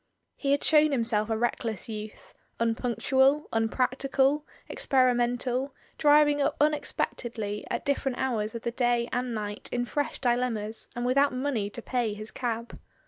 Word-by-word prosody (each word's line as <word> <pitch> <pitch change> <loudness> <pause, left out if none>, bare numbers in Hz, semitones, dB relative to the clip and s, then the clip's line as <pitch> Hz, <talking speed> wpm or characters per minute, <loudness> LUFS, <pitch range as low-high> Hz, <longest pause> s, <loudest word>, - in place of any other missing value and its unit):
He 275 - -3
had 285 - +2
shown 305 -1 +5
him 255 -4 +1
self 215 -1 +1
a 220 - 0
reckless 225 -2 -2
youth, 215 -1 -8 0.3
unpunctual, 250 +5 +2
unpractical, 265 +5 +1 0.2
expe - - -8 0.2
rimental, 245 +2 0 0.3
driving 295 -1 +5
up 280 +1 +1
unexpectedly 235 -7 -1
at - - -3
different 270 -2 0
hours 225 -4 -1
of 230 - -6
the 235 - -1
day 240 -1 +1
and 245 -1 -1
night 210 -1 -3
in 245 0 -1
fresh 290 +4 -2
dilemmas, 240 -4 -1
and 240 0 -2
with 255 +2 +3
out 280 -2 +3
money 255 -6 -1
to - - -8
pay 240 -5 -1
his 215 +1 -8
cab. 235 -1 -4
245 Hz, 155 wpm, -28 LUFS, 225-275 Hz, 0.3 s, shown